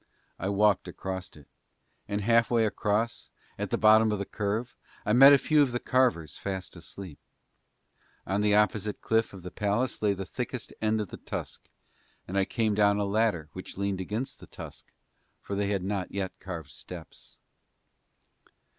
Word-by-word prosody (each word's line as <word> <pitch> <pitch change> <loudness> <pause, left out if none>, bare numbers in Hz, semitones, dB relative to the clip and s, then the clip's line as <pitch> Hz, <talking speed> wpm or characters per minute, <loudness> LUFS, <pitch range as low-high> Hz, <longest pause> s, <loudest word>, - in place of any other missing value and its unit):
I 95 - -1
walked 100 -2 +3
across 95 0 -5
it; 75 -2 -16 0.6
and 100 0 -2
half 115 +2 +4
way 115 -2 +3
across, 105 +2 -1 0.3
at - - -2
the - - 0
bottom 110 0 +6
of 105 - 0
the 100 - -3
curve, 105 +5 -2 0.3
I 105 - +2
met 135 +4 +10
a 140 - +8
few 150 +2 +3
of 135 -4 +2
the 120 - 0
carvers 120 - +1
fast 95 -2 -5
asleep. 85 -1 -10 1.1
On 95 +2 0
the 105 0 +4
opposite 105 0 +1
cliff 115 0 +2
by 95 - -10
the 90 0 -8
palace 105 +5 -1
lay 105 -2 +2
the 95 0 -5
thickest 125 +3 -5
end 110 0 +2
of 105 - -5
the - - -8
tusk - - -6 0.6
and 95 - -5
I 100 -1 +3
came 110 -2 0
down 100 0 +4
a 105 - 0
ladder 100 -6 +1
which 95 - -8
leaned 100 -1 -1
against 115 +8 -4
the - - -13
tusk - - -10 0.5
for 100 - -5
they 100 0 0
had 100 -2 -1
not 95 -1 -2
yet 95 -1 -2
carved 85 -7 -7
steps. 85 +5 -11
105 Hz, 175 wpm, -28 LUFS, 95-110 Hz, 1.1 s, met